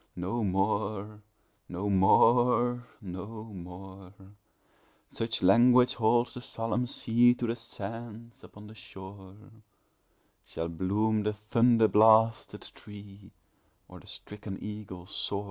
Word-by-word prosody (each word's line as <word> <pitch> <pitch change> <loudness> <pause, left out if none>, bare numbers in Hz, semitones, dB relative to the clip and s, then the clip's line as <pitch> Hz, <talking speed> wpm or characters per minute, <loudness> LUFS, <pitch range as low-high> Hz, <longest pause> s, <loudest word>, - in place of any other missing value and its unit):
No 95 +6 -3
more 105 +2 -2 0.5
no 90 +3 -4
more 120 +5 +3
no 100 +3 -8
more 95 +1 -11 1.0
(Such 115 -2 -1
language 120 +6 +5
holds 120 +1 +1
the 125 - -8
solomn 115 +1 -3
sea 120 +1 +4
To 125 - -4
the 115 0 -2
sands 115 +1 -8
upon 105 0 -14
the 105 - -12
shore) 95 -2 -12 1.1
Shall 85 +1 -5
bloom 105 +6 0
the 105 +1 -1
thunder 115 +2 +2
blasted 110 +2 +3
tree, 100 -1 -13 0.6
Or - - -13
the - - -19
stricken 105 -1 -7
eagle 105 -4 -8
soar! 100 +2 -1
105 Hz, 110 wpm, -28 LUFS, 95-115 Hz, 1.1 s, language